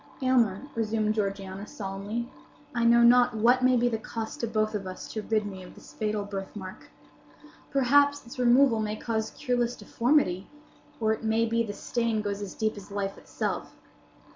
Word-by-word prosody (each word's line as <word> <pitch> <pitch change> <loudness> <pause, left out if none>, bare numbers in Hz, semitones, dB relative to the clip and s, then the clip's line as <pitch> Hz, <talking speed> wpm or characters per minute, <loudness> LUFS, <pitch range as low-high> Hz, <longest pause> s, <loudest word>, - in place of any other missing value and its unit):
"Aylmer," 240 -5 +2
resumed 215 -1 0
Georgiana, 195 -1 -3
solemnly, 205 +4 -4 0.5
"I 235 -1 0
know 235 0 +6
not 245 0 +6
what 240 +4 +4
may 255 0 +5
be 240 +1 +3
the 225 -2 -1
cost 220 0 -6
to 235 - -1
both 215 -1 0
of 200 -3 -3
us 185 0 -7
to 215 - -2
rid 215 0 0
me 190 -2 -7
of 180 - -12
this - - -14
fatal 210 -1 -1
birthmark. 195 -1 -7 0.8
Perhaps 285 +1 +3
its 235 +2 -10
removal 245 -1 +5
may 215 0 -1
cause 220 -1 -2
cureless 245 -3 -1
deformity; 230 -8 +1 0.5
or 220 -1 +2
it 220 - -6
may 225 +1 +2
be 230 0 +1
the 215 -3 -3
stain 230 0 -1
goes 205 0 -3
as 200 -2 -6
deep 215 -1 -1
as 205 - -10
life 200 -1 -3
itself. - - -4
220 Hz, 175 wpm, -28 LUFS, 205-240 Hz, 0.8 s, know